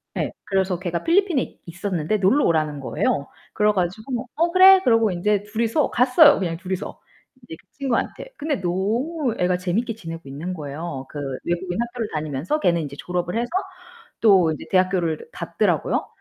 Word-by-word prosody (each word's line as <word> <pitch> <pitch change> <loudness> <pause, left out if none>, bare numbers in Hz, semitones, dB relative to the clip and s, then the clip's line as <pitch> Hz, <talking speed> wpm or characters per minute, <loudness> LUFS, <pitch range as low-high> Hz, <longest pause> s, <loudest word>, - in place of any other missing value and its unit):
네, - - -1
그래서 190 -2 0
걔가 175 -1 -3
필리핀에 345 -5 +1
있었는데 185 +1 -2
놀러 200 +10 +3
오라는 155 -3 0
거예요. 140 +1 -1 0.3
그래 210 0 +3
가지고 220 +7 -3
"어 340 +2 +1
그래." 375 +1 +8
그러고 230 - +4
이제 200 +3 0
둘이서 230 +7 0
갔어요, 270 +5 +6
그냥 170 -3 -2
둘이서. 185 +2 -5 0.4
인제 160 - -9
그 - - -25
친구한테. 270 - -2
근데 290 -6 -2
너무 230 - -1
애가 180 0 +2
재밌게 195 +6 -1
지내고 165 -5 -8
있는 155 +7 -5
거예요. 145 -3 -6
그 - - -9 0.3
외국인 175 +3 -2
학교를 235 -2 -4
다니면서 155 - -2
걔는 170 - +2
이제 140 -1 -7
졸업을 180 +2 -2
해서 240 +1 -1 0.7
또 190 -7 +5
이제 - - -8
대학교를 185 -4 +1
갔더라고요. - - 0
190 Hz, 380 characters per minute, -22 LUFS, 170-240 Hz, 0.7 s, 그래